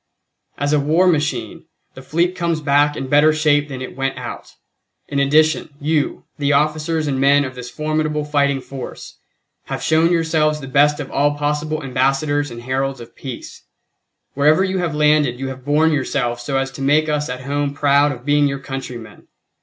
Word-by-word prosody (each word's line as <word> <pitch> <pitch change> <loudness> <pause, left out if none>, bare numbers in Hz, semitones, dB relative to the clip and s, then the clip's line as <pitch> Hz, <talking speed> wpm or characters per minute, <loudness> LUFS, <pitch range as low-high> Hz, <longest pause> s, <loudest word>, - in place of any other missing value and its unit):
"As 145 +1 0
a 150 - +4
war 155 +6 +2
machine, 160 0 -1 0.3
the 130 - -11
fleet 170 +6 0
comes 170 -3 -1
back 145 0 +2
in 135 - -3
better 145 +3 +5
shape 150 -1 +2
than 130 -2 -6
it - - -8
went 135 0 -2
out. - - -8 0.5
In 140 - -2
addition, 155 +3 +3
you, 150 -1 -1 0.2
the 145 0 +1
officers 155 +2 0
and 135 -2 -1
men 140 +1 +4
of 130 - -6
this 125 -1 -8
formidable 155 0 -2
fighting 140 -2 +1
force, 135 -1 -9 0.5
have - - -5
shown 160 +2 +3
yourselves 160 -2 +1
the 135 - -8
best 145 +2 +3
of 145 - -6
all 145 +1 +1
possible 150 +1 -2
ambassadors 135 +3 0
and 120 0 -9
heralds 135 +1 -2
of 120 - -12
peace. 130 -4 -8 0.7
Wherever 150 +6 +3
you 190 0 -1
have 170 -4 -2
landed 150 -4 +2
you 135 0 -3
have 130 -1 -8
borne 150 +3 +2
yourselves 130 -4 -1
so 135 +3 -2
as 135 0 -1
to 135 - -9
make 150 +3 +3
us 150 -2 -1
at 125 +1 -5
home 140 +1 -2
proud 145 0 +3
of 125 -2 -9
being 145 0 +3
your 140 0 -2
countrymen. 130 -4 -8
145 Hz, 185 wpm, -19 LUFS, 135-155 Hz, 0.7 s, better